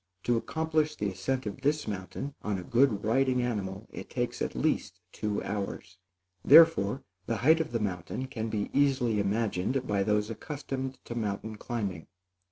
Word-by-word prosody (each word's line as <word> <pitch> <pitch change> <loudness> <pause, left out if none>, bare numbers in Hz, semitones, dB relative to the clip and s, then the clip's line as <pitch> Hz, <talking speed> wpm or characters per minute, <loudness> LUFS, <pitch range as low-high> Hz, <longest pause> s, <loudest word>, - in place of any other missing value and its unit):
To 120 - +2
accomplish 155 +4 0
the 105 -6 -1
ascent 120 +8 -2
of 105 +5 -5
this 145 +2 +1
mountain 100 +7 -5
on 105 -2 -1
a 90 - -5
good 115 0 +3
riding 130 +3 +2
animal, 100 -4 -3
it - - -8
takes, - - -2
at - - -2
least, - - 0
two 105 -1 -2
hours; 100 -2 -5 0.4
therefore, 140 -8 +7 0.2
the 115 - 0
height 160 +2 +7
of 160 -1 -2
the 115 - 0
mountain 95 +4 -3
can 115 -4 -4
be 105 -2 -2
easily 130 -6 +2
imagined 110 +4 0
by 100 -4 +1
those 105 +2 +1
accustomed 135 +2 -5
to - - -5
mountain 110 -1 -3
climbing. 100 -7 -4
115 Hz, 165 wpm, -29 LUFS, 100-135 Hz, 0.4 s, therefore